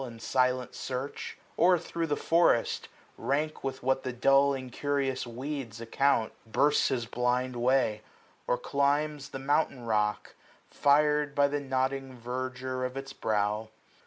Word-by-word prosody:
In 120 Hz, -3 st, -8 dB
silent 125 Hz, +1 st, +1 dB
search; 130 Hz, +2 st, -5 dB, 0.2 s
or 180 Hz, +2 st, +5 dB
thro* 165 Hz, 0 st, -3 dB
the 145 Hz, -, +1 dB
forest, 165 Hz, -9 st, +2 dB, 0.3 s
rank 145 Hz, +6 st, -1 dB
225 -, -, -25 dB
With 135 Hz, -2 st, -4 dB
what 130 Hz, +1 st, +2 dB
the 130 Hz, -, -2 dB
dull 135 Hz, +3 st, +4 dB
incurious 135 Hz, 0 st, -2 dB
weeds 125 Hz, -1 st, -5 dB
account. 115 Hz, 0 st, +1 dB
Bursts 145 Hz, +6 st, +3 dB
his 120 Hz, -3 st, -1 dB
blind 125 Hz, +2 st, 0 dB
way; 120 Hz, -3 st, +2 dB, 0.5 s
or 125 Hz, -, +2 dB
climbs 140 Hz, +2 st, 0 dB
the -, -, -6 dB
mountain 135 Hz, -2 st, 0 dB
rock, 105 Hz, -2 st, 0 dB, 0.4 s
FirM 150 Hz, 0 st, +3 dB
by 145 Hz, 0 st, +5 dB
the 145 Hz, +1 st, -1 dB
nodding 135 Hz, -1 st, -2 dB
verdure 130 Hz, +1 st, -4 dB
of 130 Hz, +1 st, -3 dB
its 135 Hz, 0 st, -6 dB
brow. 105 Hz, 0 st, -1 dB
130 Hz, 140 wpm, -29 LUFS, 125-140 Hz, 0.5 s, or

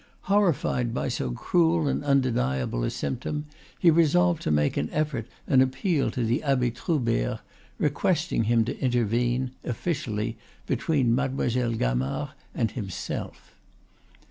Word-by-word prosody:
Horrified 170 Hz, -, +1 dB
by -, -, -1 dB
so 65 Hz, -, -2 dB
cruel 165 Hz, -, +2 dB
and 140 Hz, -, -1 dB
undeniable 65 Hz, -, +1 dB
a -, -, +1 dB
symptom, 150 Hz, +4 st, -3 dB, 0.3 s
he 170 Hz, -, +5 dB
resolved 170 Hz, +1 st, +3 dB
to -, -, -2 dB
make 75 Hz, -1 st, +2 dB
an 75 Hz, -, -1 dB
effort 145 Hz, -7 st, -1 dB, 0.2 s
and 130 Hz, -, +4 dB
appeal 135 Hz, +4 st, +1 dB
to 125 Hz, -, -2 dB
the 120 Hz, +6 st, +1 dB
Abbe 130 Hz, -4 st, +1 dB
Troubert, 120 Hz, -, -1 dB, 0.4 s
requesting 115 Hz, -, +1 dB
him 115 Hz, 0 st, +3 dB
to 125 Hz, -, -4 dB
intervene, 120 Hz, 0 st, +1 dB
officially, 115 Hz, -5 st, -2 dB, 0.3 s
between 130 Hz, -1 st, +1 dB
Mademoiselle 125 Hz, -2 st, 0 dB
Gamard 65 Hz, -, -1 dB, 0.3 s
and -, -, 0 dB
himself. -, -, -6 dB
125 Hz, 125 wpm, -26 LUFS, 115-150 Hz, 0.4 s, he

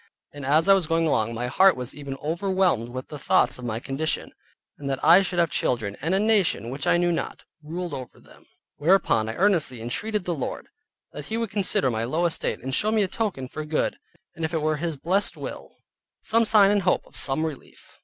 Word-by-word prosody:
And 145 Hz, -1 st, -8 dB
as 150 Hz, +5 st, +3 dB
I 195 Hz, -, +8 dB
was 190 Hz, -5 st, +1 dB
going 165 Hz, +1 st, +1 dB
along, 115 Hz, -6 st, 0 dB
my 120 Hz, +2 st, -3 dB
heart 185 Hz, +9 st, +4 dB
was 125 Hz, 0 st, -5 dB
even 140 Hz, -2 st, -7 dB
overwhelmed 175 Hz, -, 0 dB
with 130 Hz, +1 st, -7 dB
the 150 Hz, -, -7 dB
thoughts 125 Hz, -1 st, +2 dB
of 125 Hz, -, -7 dB
my 115 Hz, -1 st, -2 dB
condition, 140 Hz, +5 st, -3 dB, 0.5 s
and 140 Hz, -1 st, -5 dB
that 135 Hz, -, -3 dB
I 170 Hz, +5 st, +8 dB
should 185 Hz, -2 st, -3 dB
have 170 Hz, -2 st, +2 dB
children, 110 Hz, -5 st, -1 dB
and 165 Hz, +6 st, 0 dB
a -, -, +2 dB
nation 205 Hz, -, +2 dB
which 135 Hz, +1 st, -4 dB
I -, -, +4 dB
knew 175 Hz, 0 st, +2 dB
not, 165 Hz, -, -4 dB, 0.2 s
ruled 170 Hz, +2 st, -5 dB
over 130 Hz, -3 st, -8 dB
them. -, -, -20 dB, 0.3 s
Whereupon 145 Hz, -, +2 dB
I 110 Hz, -, -4 dB
earnestly 170 Hz, -, +1 dB
entreated 200 Hz, -, -2 dB
the 175 Hz, -, -1 dB
Lord, 140 Hz, -6 st, -5 dB, 0.4 s
that -, -, -8 dB
He 220 Hz, -, -2 dB
would 230 Hz, -3 st, -2 dB
consider 190 Hz, -10 st, +1 dB
my 110 Hz, 0 st, -2 dB
low 155 Hz, +9 st, 0 dB
estate, 170 Hz, -, -1 dB
and 130 Hz, 0 st, -4 dB
show 215 Hz, +10 st, +1 dB
me 220 Hz, -2 st, +3 dB
a -, -, 0 dB
token 185 Hz, -, -3 dB
for 155 Hz, -, -6 dB
good, 150 Hz, 0 st, -1 dB, 0.4 s
and 165 Hz, -, -7 dB
if 160 Hz, +1 st, -2 dB
it 160 Hz, -, 0 dB
were 155 Hz, 0 st, +1 dB
His 165 Hz, -1 st, -3 dB
blessed 190 Hz, +8 st, 0 dB
will, -, -, -8 dB, 0.5 s
some 230 Hz, +1 st, +2 dB
sign 205 Hz, -2 st, +6 dB
and 205 Hz, -1 st, +2 dB
hope 180 Hz, 0 st, +1 dB
of -, -, -19 dB
some 140 Hz, +4 st, 0 dB
relief. 155 Hz, -5 st, -9 dB
160 Hz, 225 wpm, -25 LUFS, 130-190 Hz, 0.5 s, I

